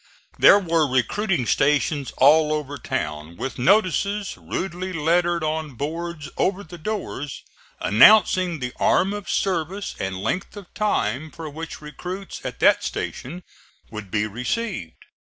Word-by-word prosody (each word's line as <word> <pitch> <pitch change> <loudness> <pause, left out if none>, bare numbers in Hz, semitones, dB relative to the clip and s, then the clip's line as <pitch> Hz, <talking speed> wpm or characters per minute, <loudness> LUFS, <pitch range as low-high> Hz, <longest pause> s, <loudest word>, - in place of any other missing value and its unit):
There - - +8
were 165 -7 +1
recruiting 130 - +1
stations 145 +2 +1
all 150 +3 +5
over 145 -2 -4
town, 75 -4 -4
with 135 -1 -5
notices, 200 - +2
rudely 185 0 -4
lettered 170 +1 +1
on 155 -3 -2
boards 160 +3 -4
over 195 +1 0
the 170 0 -11
doors, 155 -8 -5 0.4
announcing 180 - +5
the 125 -2 -5
arm 195 +2 +3
of 205 -1 -6
service 190 +1 -1
and 95 -1 -3
length 185 - -3
of 195 -4 -11
time 155 - -1
for 160 -1 -8
which 160 +2 -7
recruits 180 +6 -7
at - - -6
that - - +5
station 175 +8 -5 0.5
would 110 -3 -7
be 105 +2 0
received. 125 - -4
160 Hz, 135 wpm, -23 LUFS, 135-185 Hz, 0.5 s, There